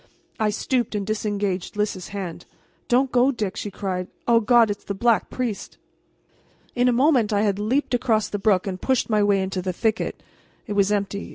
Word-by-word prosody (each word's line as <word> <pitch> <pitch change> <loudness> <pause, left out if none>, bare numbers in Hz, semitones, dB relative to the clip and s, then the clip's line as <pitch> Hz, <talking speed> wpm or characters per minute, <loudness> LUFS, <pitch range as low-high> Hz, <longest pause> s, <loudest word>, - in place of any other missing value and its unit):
I 215 -1 +2
stooped 235 +2 -1
and 200 -1 -2
disengaged 205 -3 -2
Lys's 210 -3 -2
hand. 180 -4 -6 0.4
"Don't 255 +2 +2
go, 250 +2 +4
Dick!" 215 -6 -3
she 205 - -4
cried. 185 -2 -4 0.2
"O 235 -1 +5
God, 230 -1 +4
it's 205 - -6
the 200 - -4
Black 230 +2 +2
Priest!" 240 -5 -4 1.0
In 245 0 +2
a - - +4
moment 250 -3 +3
I 205 0 +2
had 200 -2 0
leaped 250 +7 0
across 235 -4 +1
the 205 - -4
brook 195 -3 +2
and 185 -2 -4
pushed 260 -3 0
my 210 -1 +3
way 205 -1 +3
into 190 -1 -3
the 185 0 -3
thicket. 220 +4 -1 0.4
It 210 - -4
was 200 0 +2
empty. 200 -1 -2
210 Hz, 190 wpm, -23 LUFS, 200-235 Hz, 1.0 s, O